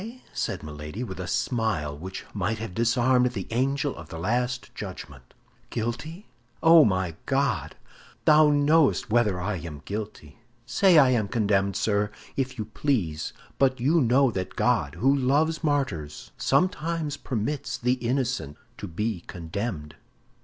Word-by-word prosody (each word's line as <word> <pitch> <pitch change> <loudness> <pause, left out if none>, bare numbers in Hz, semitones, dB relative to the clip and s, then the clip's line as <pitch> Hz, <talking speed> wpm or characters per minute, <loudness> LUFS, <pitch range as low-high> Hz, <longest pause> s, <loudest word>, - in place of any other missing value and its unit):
said - - -3
Milady, 75 +8 -6
with 95 -7 -7
a 90 - -4
smile 110 - -1
which 95 +5 -7
might 105 +2 -1
have 110 -4 -6
disarmed 125 +3 +2
the 100 -5 -4
angel 135 +4 0
of - - -11
the 80 - -7
last 125 +7 -1
judgment. 65 -4 -9 0.3
"Guilty? 120 - -4 0.4
Oh, 165 -1 +8
my 95 - 0
God, 135 -6 0 0.5
thou 155 0 +7
knowest 145 -3 +3
whether 110 -6 +2
I 95 +2 -2
am 75 -2 -8
guilty! 105 -6 -6 0.3
Say 170 - +4
I 135 -4 +7
am 110 -5 +1
condemned, 100 -3 +1
sir, 105 -1 +1 0.3
if 130 -1 -2
you 110 - -3
please; 105 - -1 0.3
but 130 -2 +3
you 155 +7 +3
know 130 +1 +4
that 95 -3 -4
God, - - +1
who 135 +11 +3
loves 145 +5 +1
martyrs, 130 - -2
sometimes 165 -4 0
permits 135 +3 -3
the 125 +1 +1
innocent 125 - -2 0.2
to - - -5
be 105 +2 -3
condemned." 80 -3 -5
120 Hz, 140 wpm, -26 LUFS, 95-135 Hz, 0.5 s, Oh